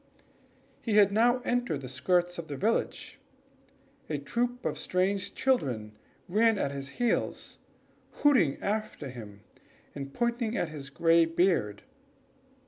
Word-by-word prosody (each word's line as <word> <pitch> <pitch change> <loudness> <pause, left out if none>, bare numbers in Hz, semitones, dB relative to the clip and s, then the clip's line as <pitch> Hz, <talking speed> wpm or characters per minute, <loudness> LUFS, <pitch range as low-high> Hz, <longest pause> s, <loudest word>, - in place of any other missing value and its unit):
He 225 - -2
had 205 -1 +6
now 240 +4 +3
entered 240 - 0
the 130 - -7
skirts 175 +7 0
of 165 - -6
the 145 -3 -5
village. 220 +8 -1 0.9
A 150 - -1
troop 240 - -2
of - - -1
strange 190 +2 0
children 125 - 0 0.3
ran 220 +4 +3
at 140 - -1
his 140 0 -6
heels, 240 -1 -1 0.5
hooting 230 - +3
after 210 -8 -3
him, 105 -5 -10 0.5
and 140 -1 -6
pointing 235 - -1
at 170 - -1
his 145 -3 -8
gray 165 +3 +4
beard. 165 - +1
175 Hz, 130 wpm, -29 LUFS, 140-225 Hz, 0.9 s, had